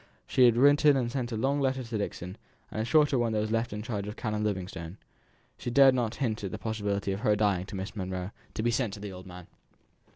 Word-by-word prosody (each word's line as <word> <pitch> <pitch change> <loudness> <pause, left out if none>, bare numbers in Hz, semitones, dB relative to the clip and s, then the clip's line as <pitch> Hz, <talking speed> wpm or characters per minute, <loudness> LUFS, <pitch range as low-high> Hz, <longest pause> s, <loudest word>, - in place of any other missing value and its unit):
She 130 -2 +4
had 120 -1 +5
written 145 +2 +6
and 120 -2 -1
sent 125 -2 -3
a 110 - -2
long 135 +5 +1
letter 130 -1 0
to 115 -2 -4
Dixon; 90 -2 -4 0.4
and 110 - -2
a - - -1
shorter 145 0 +4
one 115 -2 +1
was 110 0 -1
left 115 +1 0
in 105 +1 -5
charge 105 -4 -4
of 105 - -6
Canon 105 -2 -2
Livingstone 95 -3 -4 0.6
(she - - -4
dared 135 +1 +6
not 120 -3 -1
hint 110 -6 -2
at 100 - -2
the - - -5
possibility 100 -3 -2
of 95 - -3
her 105 0 +2
dying 100 -3 +1
to 100 - -7
Miss 95 +2 -5
Monro) 95 -1 -4 0.2
to 110 - -2
be 120 - +2
sent 115 -4 -1
to - - -10
the 100 -1 -6
old 90 0 -10
man. 90 -1 -10
110 Hz, 240 wpm, -29 LUFS, 100-125 Hz, 0.6 s, written